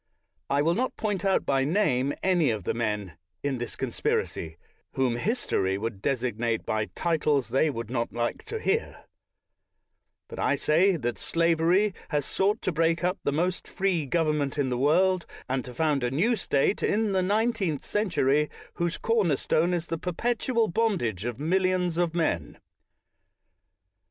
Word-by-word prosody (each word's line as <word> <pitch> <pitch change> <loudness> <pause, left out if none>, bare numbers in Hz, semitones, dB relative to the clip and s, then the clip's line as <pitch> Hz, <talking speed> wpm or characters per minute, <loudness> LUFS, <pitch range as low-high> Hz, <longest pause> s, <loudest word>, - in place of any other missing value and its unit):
I 140 +1 +2
will 165 +2 +3
not 255 +7 -1
point 205 -4 -2
out 195 -1 +2
by 135 -1 +2
name 140 -5 +1
any 180 -5 +3
of 110 -4 -2
the - - -1
men, 105 -7 -3 0.2
in 140 -3 -1
this 120 - -5
conspiracy, 80 0 -2 0.4
whom 130 -3 +1
history 120 - 0
will 115 +3 -2
designate 115 +1 -1
by 110 0 0
titles 150 -6 +1
they 135 +6 +2
would 115 -4 -5
not 120 -2 -1
like 120 0 -2
to 450 - -4
hear; 435 +2 -1 1.2
but - - -9
Lt - - 0
y 175 +4 +4
that 120 -4 -3
slavery 170 +4 +2 0.2
has 145 -4 0
sought 205 +3 0
to - - 0
break 165 +1 +1
up 180 +2 0
the - - +1
most 175 +5 -1
free 180 -6 0
government 150 -2 0
in 140 -3 +1
the 125 - -1
world, 180 +6 +3 0.2
and 130 -1 -1
to 125 - -8
found 150 -1 +1
a 125 - +1
new 190 - +2
State, 175 -2 +1
in 215 0 +1
the 190 -1 +2
nineteenth 205 - 0
century, 150 -8 +1 0.2
whose 170 0 -2
corner 215 -10 +2
stone 165 +6 +1
is 175 -2 -1
the 165 -1 -4
per 180 +1 -3
petual 230 -1 0
bondage 145 - 0
of 120 -2 -3
millions 180 +1 +1
of 170 -1 0
men. 120 - -1
160 Hz, 160 wpm, -27 LUFS, 130-185 Hz, 1.2 s, y